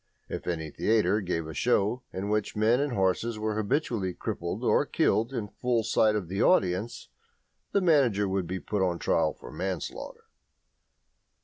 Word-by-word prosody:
If - - -6
any 80 -3 -3
theatre 110 +2 +2
gave 85 -4 -2
a 80 - -7
show 115 - +1
at 95 - -4
which 105 -1 -1
men 110 +4 +3
and 145 -2 -1
horses 100 +3 0
were 110 0 -1
habitually 110 - -1
crippled - - -4
or - - +3
killed 115 +4 +1
in 115 -6 -3
full 120 +1 -1
sight 110 -1 +3
of 100 -5 -2
the 95 +5 -2
audience, 100 - +1 0.6
the 200 - +2
manager 130 - +3
would 95 -2 -1
be 95 +2 -3
put 105 +1 -2
on 90 -2 +1
his - - -15
trial 80 -2 +2
for - - -11
manslaughter. 95 -4 -5
105 Hz, 170 wpm, -28 LUFS, 95-115 Hz, 0.6 s, men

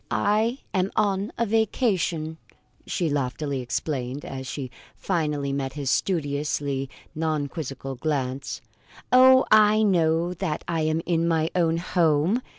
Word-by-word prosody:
"I 220 +4 +1 0.2
am 190 -1 +1
on 200 -1 +1
a 235 - +1
vacation," 195 - 0 0.5
she 175 - -1
loftily 140 -1 -2
explained, 125 +2 -3
as 130 -1 -6
she 130 -1 -5 0.2
finally 150 -6 -1
met 135 -1 -2
his 140 -3 -2
studiously 145 -5 -1 0.2
non 155 -2 -1
quizzical 135 -3 -6
glance. 135 -1 -2 0.5
"Oh, 260 +1 +7
I 215 0 +6
know 170 -3 +2
that 175 -4 -3
I 165 -2 -1
am 155 +1 0
in 170 -1 +1
my 160 -1 +1
own 165 -2 +2
home!" 170 +4 +2
160 Hz, 130 wpm, -25 LUFS, 140-190 Hz, 0.5 s, Oh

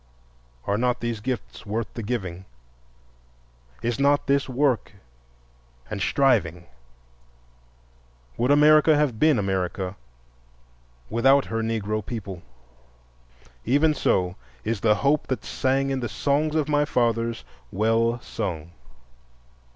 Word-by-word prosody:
Are 100 +1 0
not 125 0 +1
these 120 -2 -3
gifts 125 +3 -5
worth 110 +2 -4
the 115 - -5
giving? 95 -6 -4 1.4
Is 120 -1 -1
not 140 +1 +3
this 140 0 +1
work 130 -4 0 1.0
and 100 - -4
striving? 95 - +1 1.7
Would 125 - 0
America 150 +2 +6
have 140 -7 0
been 155 -4 +4
America 95 -1 -2 1.2
without 135 +5 +4
her 115 0 -2
Negro 110 -1 -2
people? 100 -6 -6 1.2
Even 145 +6 +3
so 90 -9 0 0.3
is 110 -1 -2
the 105 0 +3
hope 140 +5 +1
that 130 -5 -3
sang 135 +1 0
in 135 - -1
the 120 -2 -3
songs 145 +7 0
of 155 -3 +1
my 145 -1 +2
fathers 115 -4 0 0.3
well 115 +4 +1
sung. 85 -8 -5
115 Hz, 110 wpm, -24 LUFS, 105-140 Hz, 1.7 s, America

